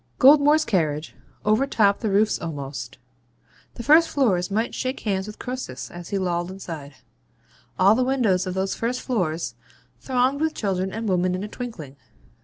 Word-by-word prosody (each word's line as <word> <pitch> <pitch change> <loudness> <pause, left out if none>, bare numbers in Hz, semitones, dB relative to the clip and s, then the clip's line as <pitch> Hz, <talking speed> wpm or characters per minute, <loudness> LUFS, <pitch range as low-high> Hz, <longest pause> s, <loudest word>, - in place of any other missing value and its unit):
Goldmore's 295 +3 +6
carriage 155 - -1 0.3
overtopped 215 -2 +3
the 220 - -1
roofs 210 +2 +2
almost; 140 -6 -6 0.8
the 235 - -6
first 315 +5 +6
floors 195 -11 +1
might 220 +4 -1
shake 260 +1 -3
hands 195 -2 -1
with 210 - -9
Croesus 250 - -6
as 175 0 -9
he 200 - -1
lolled 175 -2 -1
inside; 165 -7 -8 0.8
all 195 +3 +6
the 255 +3 +2
windows 230 -9 +1
of 185 - -3
those 190 0 -1
first 245 +2 -2
floors 175 - -2 0.5
thronged 260 +2 0
with 315 0 0
children 190 -2 -1
and 225 +2 -4
women 180 -1 +1
in 185 - -4
a - - -4
twinkling. 210 - -8
200 Hz, 160 wpm, -24 LUFS, 175-250 Hz, 0.8 s, Goldmore's